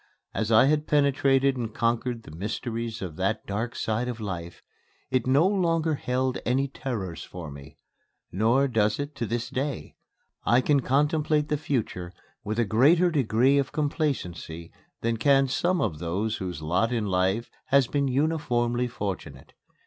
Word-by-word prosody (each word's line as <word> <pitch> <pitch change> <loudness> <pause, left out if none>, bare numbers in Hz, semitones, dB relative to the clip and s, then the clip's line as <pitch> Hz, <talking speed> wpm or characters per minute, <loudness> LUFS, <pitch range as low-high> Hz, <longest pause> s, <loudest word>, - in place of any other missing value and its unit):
As 110 0 -1
I 110 +3 +7
had 150 +2 +1
penetrated 140 -2 +3
and 115 -2 -3
conquered 115 0 0
the - - -12
mysteries 115 +3 -4
of 85 -5 -6
that 95 +4 -1
dark 115 +4 -3
side 110 +3 -1
of 120 -2 -4
life, 85 -5 -6 0.5
it 130 -2 +1
no 140 +6 +4
longer 165 -5 +1
held 130 -2 -1
any 135 +3 +1
terrors 115 - -5
for 85 -4 -8
me. 70 +2 -12 0.5
Nor 115 +8 +3
does 110 -4 +1
it 145 +1 -4
to 115 - -2
this 120 +3 -2
day. 135 0 -3 0.5
I 120 - +4
can 140 +2 +3
contemplate 150 +3 +1
the 150 - +2
future 105 - -3 0.3
with 110 +2 -3
a 120 - +2
greater 155 - +4
degree 135 -1 +3
of 135 - -1
complacency 90 - -3 0.3
than 115 0 0
can 135 +3 +4
some 175 +7 +1
of 75 - -1
those 95 +6 -2
whose 90 -5 -5
lot 90 +9 +1
in 115 -3 0
life 95 +4 0
has 140 -1 +4
been 140 +3 0
uniformly 125 -4 0
fortunate. 100 - -6
120 Hz, 155 wpm, -26 LUFS, 105-140 Hz, 0.5 s, I